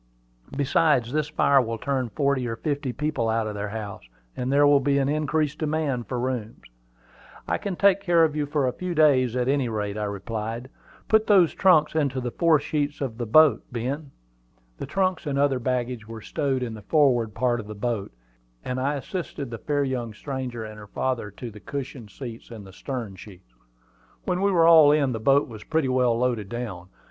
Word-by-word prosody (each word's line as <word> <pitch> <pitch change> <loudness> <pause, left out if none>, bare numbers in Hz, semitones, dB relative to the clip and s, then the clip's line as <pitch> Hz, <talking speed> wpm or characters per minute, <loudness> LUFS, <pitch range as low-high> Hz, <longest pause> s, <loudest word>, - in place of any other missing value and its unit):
Besides, 140 -3 +2
this 150 -1 0
fire 140 -3 +4
will 115 -2 -3
turn 130 0 -2
forty 140 -2 0
or 115 - -3
fifty 145 0 -2
people 135 -3 -1
out 110 0 +1
of 105 - -4
their 105 0 -4
house, 105 -2 -6 0.3
and 125 +1 -2
there 145 +1 +5
will 145 -1 +6
be 140 +1 +1
an 135 -1 +1
increased 150 0 0
demand 150 -6 -1
for 125 - -3
rooms." 120 -3 -4 0.8
"I - - 0
can 200 -3 -3
take 200 +1 +4
care 175 -4 +4
of 155 -2 +1
you 150 -1 -1
for 145 -2 0
a 125 - 0
few 180 -1 -4
days, 130 -6 +4
at 125 0 0
any 135 -3 +1
rate," 105 -1 -3
I 105 - -1
replied. 110 +5 -5 0.4
"Put 220 0 +3
those 190 -6 +5
trunks 165 -6 +4
into 140 -4 0
the 125 -1 -3
fore 165 +1 +3
sheets 145 0 -2
of 125 -4 -4
the 120 - -3
boat, 150 +1 +6
Ben." 135 +5 -4 0.7
The - - -5
trunks 185 -4 -1
and 140 -1 -1
the 140 - +4
other 135 -3 +1
baggage 125 -2 -2
were 115 0 -8
stowed 135 0 -1
in 115 -2 -4
the 110 - -9
forward 120 -4 +2
part 120 -2 +1
of 105 - -8
the 105 - -7
boat, 110 -2 -3 0.5
and 125 0 -2
I 140 +3 0
assisted 145 -3 -5
the 115 - -6
fair 145 +2 0 0.3
stranger 130 -3 -5
and 110 0 -9
her 105 - -11
father 125 -1 -2
to 115 +4 -8
the 105 - -12
cushioned 135 -3 -6
seats 120 -1 -9
in 115 -3 -9
the 95 -1 -13
stern 115 -4 -6
sheets. 90 - -14 0.7
When 180 0 -1
we 200 - +3
were 170 -3 +4
all 160 -3 +8
in, 145 -3 +2
the 115 - -3
boat 140 +5 +3
was 110 -3 -10
pretty 160 -4 0
well 125 -2 +2
loaded 120 -5 -1
down. 105 -7 -6
130 Hz, 205 wpm, -25 LUFS, 115-150 Hz, 0.8 s, all